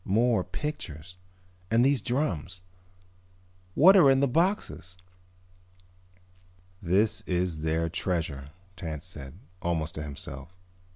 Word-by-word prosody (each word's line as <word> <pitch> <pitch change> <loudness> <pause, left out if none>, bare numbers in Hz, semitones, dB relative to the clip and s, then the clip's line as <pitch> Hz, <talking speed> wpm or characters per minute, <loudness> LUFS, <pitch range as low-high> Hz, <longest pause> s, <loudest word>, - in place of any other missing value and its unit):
"More 110 0 +2
pictures. 90 - -6 0.5
And 115 +3 +4
these 135 -3 +2
drums. 95 - -2 1.1
What 190 +6 +8
are 175 -8 +7
in 135 0 +4
the 140 - +3
boxes?" 160 - -1 1.8
"This 95 +5 +2
is 90 -3 -1
their 80 +1 0
treasure," 80 -6 -2 0.3
Tance 80 -2 -6
said, 75 -6 -7 0.3
almost 85 -2 -1
to 75 - -5
himself. 70 +2 -7
90 Hz, 105 wpm, -28 LUFS, 80-120 Hz, 1.8 s, What